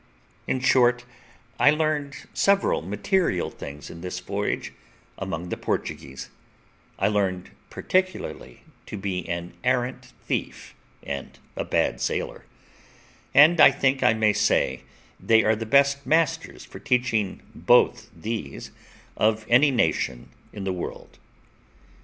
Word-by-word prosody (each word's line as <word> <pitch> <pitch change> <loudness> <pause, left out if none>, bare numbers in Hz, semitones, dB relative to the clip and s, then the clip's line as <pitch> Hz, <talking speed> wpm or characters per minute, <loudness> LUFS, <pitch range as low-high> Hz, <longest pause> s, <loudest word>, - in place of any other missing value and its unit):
In 130 - -1
short, 125 -2 +3 0.5
I - - +6
learned 150 -2 0 0.2
several 200 0 +2
material 100 - 0
things 70 +1 -9
in 85 - -10
this 90 0 -5
voyage - - -3 0.4
among 85 +2 -5
the - - -3
Portuguese; 70 0 -4 0.7
I 100 - +2
learned 95 -3 -1 0.2
particularly 185 - -2 0.2
to - - -6
be 95 -3 -4
an 85 +1 -4
arrant 125 0 -1
thief - - -4 0.3
and 70 -1 -6 0.2
a - - -2
bad - - 0
sailor; - - -3 0.9
and 155 +3 +7
I - - +10
think 135 0 0
I 110 - +4
may 110 -1 +3
say 105 - +1 0.4
they 110 0 +4
are 110 +1 +3
the 110 +1 -6
best 140 +2 +3
masters 165 +1 0
for - - -11
teaching 125 -7 0
both - - +3
these 85 -5 -6 0.4
of 110 0 +1
any 125 +5 +6
nation 80 - 0 0.2
in 100 - -7
the 95 -1 -1
world. 90 - -7
115 Hz, 125 wpm, -25 LUFS, 95-140 Hz, 0.9 s, I